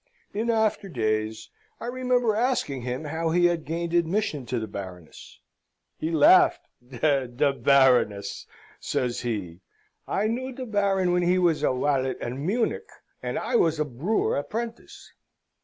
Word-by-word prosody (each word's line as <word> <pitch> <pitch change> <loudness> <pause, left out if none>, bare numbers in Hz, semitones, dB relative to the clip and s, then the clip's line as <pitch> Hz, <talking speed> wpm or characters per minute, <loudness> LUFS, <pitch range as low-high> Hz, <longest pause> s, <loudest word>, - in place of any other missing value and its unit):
In 220 +3 -2
after 220 -3 +1
days 110 -5 -2 0.3
I - - -6
remember 250 -2 +1
asking 225 - 0
him 125 +4 -4
how 160 +2 -2
he 175 +2 +3
had 170 -2 +1
gained 170 +2 -3
admission 170 - 0
to 125 - -2
the 110 - -3
Baroness? 95 -5 -10 0.6
He 160 - -3
laughed: 165 +3 +5 0.2
"De 135 +1 +1
Baroness!" 125 -7 +3 0.3
says 125 -2 -2
he. 100 -8 -4 0.5
"I 200 - 0
knew 255 +4 -2
de 255 +1 -6
Baron 200 -4 +1
when 180 - +2
he 175 +1 +2
was 170 -5 +2
a 150 - +2
walet 130 0 0
at 120 - -4
Munich, 220 - -2 0.3
and - - -3
I 245 - 0
was 165 -5 +2
a 150 - +1
brewer 150 - -1
apprentice." 230 +10 -6
160 Hz, 145 wpm, -26 LUFS, 125-210 Hz, 0.6 s, laughed